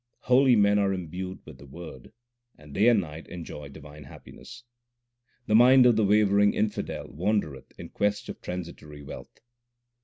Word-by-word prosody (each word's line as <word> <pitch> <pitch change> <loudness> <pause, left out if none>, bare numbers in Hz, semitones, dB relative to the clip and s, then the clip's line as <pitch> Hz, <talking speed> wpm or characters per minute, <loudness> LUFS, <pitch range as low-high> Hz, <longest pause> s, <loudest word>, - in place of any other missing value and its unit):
Holy 125 0 +4
men 105 -1 +3
are 100 -1 +1
imbued 90 +1 -7
with 75 -4 -13
the 70 - -13
Word, 70 -3 -11 0.5
and 75 -1 -15
day 105 +8 +2
and 120 -3 +5
night 80 -2 -10
enjoy 75 -4 -9
divine 75 +1 -13
happiness. 120 - -13 0.8
The - - -2
mind 125 +3 +6
of 120 -2 +5
the 110 - +2
wavering 105 0 +3
infidel 105 -1 -3
wandereth 80 -3 -3
in - - -10
quest 105 0 -2
of - - -9
transitory 85 -5 -8
wealth. - - -11
95 Hz, 155 wpm, -26 LUFS, 75-105 Hz, 0.8 s, mind